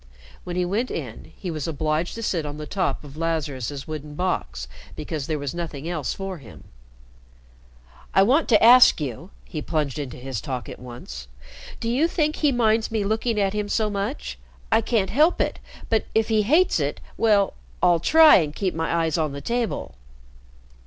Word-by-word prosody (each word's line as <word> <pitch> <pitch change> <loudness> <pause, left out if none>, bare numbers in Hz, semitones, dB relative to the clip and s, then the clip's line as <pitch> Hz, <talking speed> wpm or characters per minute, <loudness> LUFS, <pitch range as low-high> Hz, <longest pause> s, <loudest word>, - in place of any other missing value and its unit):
When 175 - -5
he 180 0 +1
went 215 +8 -1
in, 125 -8 -6
he 180 - -5
was 155 -2 -4
obliged 155 +2 -1
to 230 - -6
sit 175 -6 0
on 145 0 -6
the 150 - -6
top 185 0 -2
of 145 0 -12
Lazarus's 145 -4 -3
wooden 150 -1 -6
box 65 - -2 0.3
because 150 -2 -4
there 155 - -1
was 140 -2 -4
nothing 165 -3 -5
else 155 -8 -2
for 195 -3 -5
him. 115 -6 -14 1.5
"I 195 - +7
want 270 +10 +3
to 220 -3 +5
ask 245 -2 +8
you," 150 - -5 0.2
he 155 - -5
plunged 150 -3 -2
into 135 -4 -5
his 125 -3 -5
talk 125 -6 -5
at - - -9
once, 120 - -9 0.5
"do 230 - -4
you 260 +8 +2
think 305 -3 0
he 295 -2 +3
minds 225 -3 +2
me 220 -2 -1
looking 220 +2 0
at 195 -1 +1
him 210 -1 -2
so 215 -1 +1
much? - - -4 0.3
I - - +4
can't 220 -4 0
help 305 +8 +3
it - - -1 0.3
but 225 -1 +1
if 220 0 +2
he 220 -1 +3
hates 310 - +3
it - - -2 0.2
well 205 -3 +3 0.3
I'll 175 -2 +5
try 320 - +7
and 155 -4 -1
keep 190 -3 -1
my 160 0 -2
eyes 160 0 0
on 155 -3 -1
the 140 - -5
table." 235 - -2
175 Hz, 185 wpm, -24 LUFS, 145-220 Hz, 1.5 s, ask